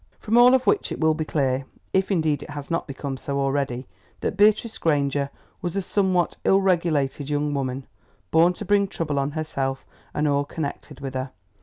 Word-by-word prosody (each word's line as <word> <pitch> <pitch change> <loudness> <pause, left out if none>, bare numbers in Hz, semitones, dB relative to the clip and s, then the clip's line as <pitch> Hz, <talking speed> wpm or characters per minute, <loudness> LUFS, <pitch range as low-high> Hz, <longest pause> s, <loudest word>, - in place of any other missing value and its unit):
From 220 +2 -1
all 245 +2 +8
of 260 -1 +1
which 415 - +2
it - - -4
will 160 -1 +4
be 155 0 -3
clear, 135 -3 0 0.3
if 190 0 +2
indeed 160 -6 +1
it - - -9
has 145 +1 -7
not 165 - -1
become 135 -1 -5
so 140 +1 -3
already, 135 -2 -1 0.4
that - - -1
Beatrice 215 +3 +3
Granger 140 -3 +1 0.3
was 175 0 -3
a 195 - +1
somewhat 185 -2 +1
ill 195 - +5
regulated 160 -7 +1
young 145 0 0
woman, 135 -1 -2 0.5
born 170 +2 +5
to 210 - -7
bring 200 0 +3
trouble 150 -6 -2
on 140 +1 0
herself 135 -4 -3 0.3
and 150 0 0
all 140 0 +2
connected 145 -1 -6
with 135 -1 -5
her. 130 0 -3
150 Hz, 190 wpm, -24 LUFS, 140-185 Hz, 0.5 s, all